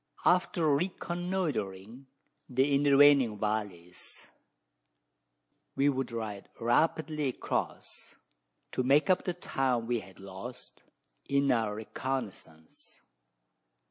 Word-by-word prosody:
After 175 -2 +3
reconnoitring 145 - -3 0.4
the 135 +3 +2
intervening 140 -4 +5
valleys, 100 -5 -5 1.5
we 140 +1 +3
would 135 -2 -2
ride 110 -3 -5
rapidly 150 +5 +1
across, 130 - -4 0.6
to - - -1
make 140 +8 +4
up 185 - +1
the 180 - -2
time 130 -8 -1
we 120 0 0
had 95 -2 -14
lost 100 +6 -10 0.5
in 140 0 +3
our 110 -3 +1
reconnoissance. 110 -9 -6
130 Hz, 90 wpm, -30 LUFS, 105-145 Hz, 1.5 s, intervening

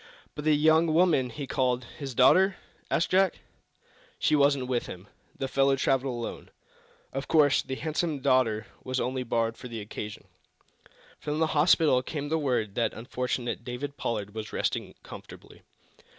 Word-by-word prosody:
"But 150 - -7
the 155 -1 +5
young 160 +2 +4
woman 155 -6 +3
he 140 +4 -6
called 125 -2 0 0.2
his 135 -4 -6
daughter?" 185 - +5 0.3
asked - - 0
Jack 190 -1 +3 0.8
"She - - +2
wasn't 140 -2 +3
with 125 -2 -1
him. 90 +2 -9 0.3
The 135 - -2
fellow 135 +1 +3
traveled 135 -1 0
alone. 120 -1 -6 0.6
Of 135 +1 -4
course, 145 -3 +4
the 130 - -5
handsome 155 +1 -2
daughter 125 -5 +2 0.2
was 130 0 -2
only 130 +2 -1
borrowed 115 -2 -1
for - - -8
the 115 -2 -6
occasion." 105 0 -7 1.0
From 150 0 -3
the 160 - +3
hospital 150 -3 +4
came 145 +2 -5
the 160 +1 +1
word 120 -8 -1
that 115 - -1
unfortunate 125 0 -3
David 130 +4 -5
Pollard 105 -6 -3
was 110 -1 -6
resting - - -2
comfortably. - - -12
130 Hz, 155 wpm, -28 LUFS, 120-150 Hz, 1.0 s, the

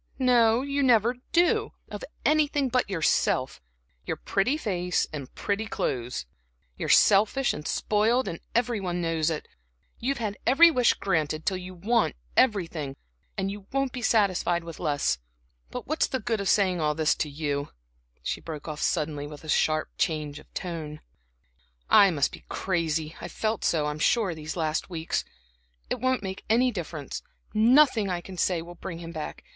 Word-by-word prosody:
no, 245 -2 +4
you 280 0 -1
never 240 -2 +4
do, 350 +1 +2 0.2
of - - -6 0.2
anything 295 -3 +2
but 250 -3 +1
yourself, 155 - +1 0.4
your - - -3
pretty 225 +10 0
face 180 - 0
and 140 -4 -6
pretty 210 +2 -2
clothes! 125 - -2 0.5
You're - - -4
selfish 215 +6 +5
and 150 - -6
spoiled 225 +5 +1 0.3
every 235 -3 +1
one 180 -2 -2
knows 165 -2 0
it; 160 -2 -4 0.5
you've 275 +4 -1
had 215 -3 -3
every 330 +7 +7
wish 250 -5 +3
granted 155 -4 -1
till 190 - +1
you 185 0 -8
want 220 +6 +1 0.2
everything, 165 - +1 0.4
and 195 0 -1
you 200 -1 -9
won't 275 -1 0
be 250 - -6
satisfied 190 -6 +2
with 165 -1 -9
less. 145 - 0 0.5
But - - -6
what's 310 +3 +1
the 260 - -2
good 225 -4 -1
of 195 - -1
saying 185 -4 +3
all 150 -1 +1
this 155 0 +3
to 150 - -1
you?" 145 -1 -2 0.5
she - - -3
broke 155 -2 -7
off 155 -1 -5
suddenly, 150 -1 -1
with 150 0 -10
a 155 - -9
sharp 155 0 +2
change 150 -2 -1
of - - -18
tone. 160 -4 -5 0.9
"I 200 - +8
must 145 -6 +1
be - - -11
crazy; 165 -3 -1
I've 175 - -6
felt 220 -1 -2
so, 155 -3 +2
I'm 150 0 -3
sure, 200 +1 +2
these 155 +1 -6
last 160 0 -1
weeks. 165 -2 -2 0.7
It - - -1
won't 255 -3 +1
make 190 0 -5
any 245 +3 +4
difference 160 - -5 0.3
nothing 230 -1 +5
I 175 -1 -2
say 175 -1 0
can 175 +1 -10
bring 180 -3 -5
him 165 0 -8
back. 155 -2 -6
185 Hz, 165 wpm, -27 LUFS, 155-230 Hz, 0.9 s, I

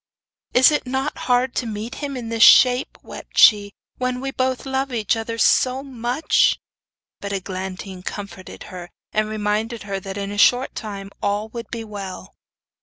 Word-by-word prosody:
'Is 255 +4 +7
it 295 -3 -1
not 265 +1 -2
hard 250 +1 +2
to 245 - -2
meet 220 +3 -5
him 280 -2 -4
in 235 -2 -6
this 230 -1 -2
shape,' 250 +3 +6
wept - - -11
she, 205 -2 +6 0.3
'when 255 0 -1
we 270 +1 -4
both 260 0 -1
love 265 0 -2
each 220 -4 0
other 230 0 -4
so 255 +3 +3
much?' 255 +2 +1 0.6
But 200 0 -5
Eglantine 190 0 -5
comforted 200 -1 -8
her, 175 -1 -8 0.2
and 215 0 +1
reminded 215 +2 -2
her 200 -1 -4
that 195 +1 -7
in 200 0 -4
a 205 - -4
short 250 +5 +4
time 200 -3 -7
all 205 +2 -1
would 230 -1 -8
be 230 -1 -5
well. 200 -3 -8
225 Hz, 170 wpm, -22 LUFS, 200-250 Hz, 0.6 s, Is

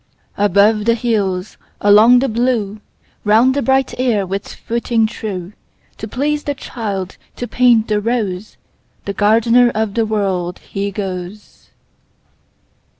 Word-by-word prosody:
Above 205 +2 +3
the 230 0 +3
hills, 205 -5 -2 0.2
along 215 +4 +6
the 265 +2 +2
blue, 225 -3 -1 0.4
Round 225 +5 +4
the 285 - -1
bright 265 -1 +1
air 230 -6 +1
with 195 +2 -4
footing 235 -1 -1
true, 200 -4 -5 0.5
To 220 - -5
please 295 +6 -2
the 285 - -2
child, 200 -8 -5 0.2
to 245 - -5
paint 240 -3 +3
the 210 -1 0
rose, 210 -4 -3 0.5
The 200 - -3
gardener 230 +4 +4
of 215 -2 -1
the 225 0 0
World, 190 -4 -1
he 200 +1 -4
goes. 190 0 -7
215 Hz, 130 wpm, -17 LUFS, 200-240 Hz, 0.5 s, along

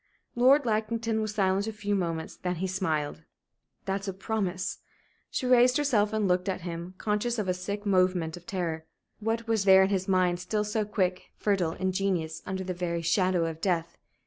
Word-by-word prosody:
Lord 260 +4 +5
Lackington 225 0 0
was 215 -1 -3
silent 195 0 +1
a - - -1
few 205 -1 -3
moments, 165 -4 -2
then 180 0 -3
he 180 +3 -2
smiled. 160 -6 -1 0.6
"That's 195 +1 -2
a 195 - -2
promise?" 190 -2 -2 0.5
She - - -2
raised 250 +1 +5
herself 225 -8 +2
and 215 -2 +1
looked 180 +1 +1
at 185 -1 -2
him, 170 +1 -6
conscious 215 +4 -1
of 210 -3 -1
a 185 - +2
sick 200 +3 -5
movement 185 -4 +2
of 175 0 -13
terror. 165 -4 -3 0.3
What 225 +1 -2
was 225 -3 +1
there 190 0 +8
in 190 - +2
his 190 -1 0
mind, 180 -2 +2
still 210 +4 -1
so 210 +1 -1
quick, 190 -3 -1
fertile, 190 -6 0
ingenious, 185 -4 -1
under 190 0 -3
the 185 0 -3
very 170 -1 -2
shadow 180 0 +2
of 165 -1 -5
death? 170 -3 -1
190 Hz, 185 wpm, -28 LUFS, 180-210 Hz, 0.6 s, there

